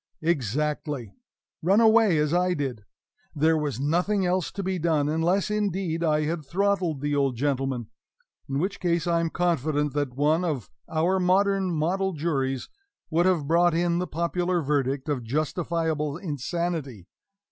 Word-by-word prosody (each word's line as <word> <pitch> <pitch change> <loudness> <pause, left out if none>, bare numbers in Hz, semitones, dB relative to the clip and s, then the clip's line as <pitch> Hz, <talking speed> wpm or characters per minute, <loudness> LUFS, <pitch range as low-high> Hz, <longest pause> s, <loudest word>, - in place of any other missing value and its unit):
Exactly; 145 - -1 0.5
run 190 +6 +4
away 220 -5 +5
as 150 +1 +1
I 180 0 +2
did. 130 -8 -4 0.5
There 160 +2 +3
was 150 -5 -2
nothing 180 +7 +1
else 180 0 0
to 200 - -4
be 190 -1 -1
done, 155 -3 +1
unless, 170 +7 +1
indeed, 190 -5 -1
I 155 -2 +2
had 155 +1 -2
throttled 180 -2 0
the 145 0 -1
old 135 -3 +1
gentleman; 135 -2 -1 0.6
in 135 - -1
which 190 +6 -2
case 170 -3 0
I 170 -1 +2
am 165 0 0
confident 155 -4 0
that 145 -4 -2
one 150 +5 +2
of 150 -8 -3 0.2
our 165 +4 +1
modern 190 +1 +2
model 185 +4 0
juries 135 -5 -1 0.4
would 170 +3 +3
have 175 -6 +2
brought 170 +1 +3
in 170 0 +1
the 180 - -2
popular 175 +2 -1
verdict 140 -2 -1
of 140 -5 -1
justifiable 155 +2 -1
insanity. 155 - -3
160 Hz, 150 wpm, -26 LUFS, 145-180 Hz, 0.6 s, away